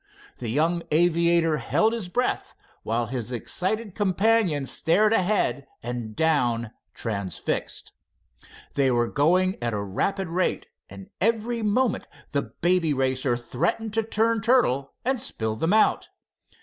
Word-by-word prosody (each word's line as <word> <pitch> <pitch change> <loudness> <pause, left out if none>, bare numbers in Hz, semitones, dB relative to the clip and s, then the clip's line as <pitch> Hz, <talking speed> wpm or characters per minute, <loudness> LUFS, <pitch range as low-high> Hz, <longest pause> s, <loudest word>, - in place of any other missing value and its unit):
The 120 - -4
young 165 +7 +1
aviator 170 0 +3
held 220 +8 +1
his 220 -6 -4
breath, 250 +7 -1 0.3
while 115 +2 -1
his 120 0 -4
excited 190 - -2
companion 200 -6 +2
stared 210 +10 +2
ahead 180 - +1 0.2
and 120 -2 -5
down, 120 -8 +1 0.2
transfixed. 100 -7 -4 0.8
They 140 -2 +2
were 120 -1 +2
going 180 +8 +2
at 120 -1 -1
a - - -1
rapid 190 - -1
rate, 180 +3 -1 0.2
and 100 -1 -11
every 230 +2 0
moment 220 +2 +1 0.2
the 140 - +1
Baby 170 -3 0
Racer 130 -1 0
threatened 170 - -2
to 225 - +2
turn 225 0 +1
turtle 225 - +2
and 260 -2 0
spill 110 -1 -3
them 160 - 0
out. 215 +1 +3
165 Hz, 130 wpm, -25 LUFS, -, 0.8 s, aviator